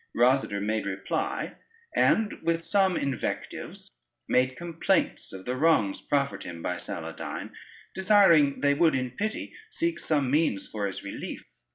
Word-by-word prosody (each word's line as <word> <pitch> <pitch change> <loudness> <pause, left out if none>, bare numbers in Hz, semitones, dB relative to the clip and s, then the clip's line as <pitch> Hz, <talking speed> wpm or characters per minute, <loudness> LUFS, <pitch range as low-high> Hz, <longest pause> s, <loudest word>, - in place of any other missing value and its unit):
Rosader 120 -4 +3
made 110 0 -1
reply, 95 0 -3 0.4
and 220 -2 +2
with 165 0 0
some 190 -2 +2
invectives 135 -4 -4 0.4
made 130 +1 +2
complaints 170 -1 0
of 95 0 -9
the 125 - -2
wrongs 130 -9 +2
proffered 140 -1 0
him 85 -1 -8
by 90 - -1
Saladyne, - - -6 0.4
desiring 185 -8 +5
they 145 0 +4
would 155 0 +3
in 130 -1 -1
pity 215 - -3 0.2
seek 340 -5 -1
some 145 -5 +1
means 145 -10 +1
for 105 -2 -2
his 95 - -6
relief. 100 - -6
140 Hz, 140 wpm, -27 LUFS, 110-170 Hz, 0.4 s, desiring